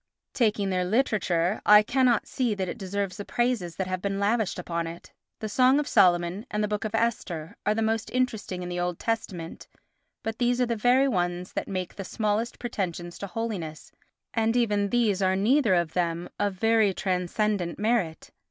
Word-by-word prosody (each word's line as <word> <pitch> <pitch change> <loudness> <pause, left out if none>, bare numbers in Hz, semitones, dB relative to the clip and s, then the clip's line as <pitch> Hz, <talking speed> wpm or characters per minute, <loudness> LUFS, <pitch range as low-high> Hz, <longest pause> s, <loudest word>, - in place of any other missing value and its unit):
Taking 210 -6 +1
their 185 -1 +1
literature 190 -4 +1
I 210 0 +8
cannot 245 -1 +2
see 245 -5 -1
that 190 -2 -2
it - - -6
deserves 195 0 -3
the 205 - -5
praises 240 -8 -1
that 190 - -2
have 185 0 -3
been 195 0 -2
lavished 210 0 +1
upon 170 -2 -3
it. 165 +1 -10 0.3
The 215 - -2
Song 255 +6 +4
of 295 - -2
Solomon 175 +2 +3
and 210 0 -1
the - - +1
book 210 +1 -2
of 215 0 -2
Esther 205 -6 -2
are 210 - +3
the 225 - 0
most 225 0 0
interesting 220 -8 -2
in 175 - -5
the 175 0 -3
Old 175 -1 -1
Testament, 185 -7 -4 0.6
but 225 0 -4
these 245 0 +2
are 250 - +3
the 235 -1 -1
very 245 +5 +4
ones 180 -5 -1
that - - -3
make 185 -2 -4
the 195 - -4
smallest 215 +3 -1
pretensions 180 -7 -4
to 200 - -4
holiness, 190 -8 -5 0.4
and 225 0 +1
even 205 -4 +1
these 215 -5 +2
are 190 0 +3
neither 220 +1 +3
of 170 -2 0
them 170 -1 -1
of 205 -2 0
very 220 -1 +3
transcendent 185 0 -1
merit. 210 -7 -1
205 Hz, 190 wpm, -27 LUFS, 180-225 Hz, 0.6 s, I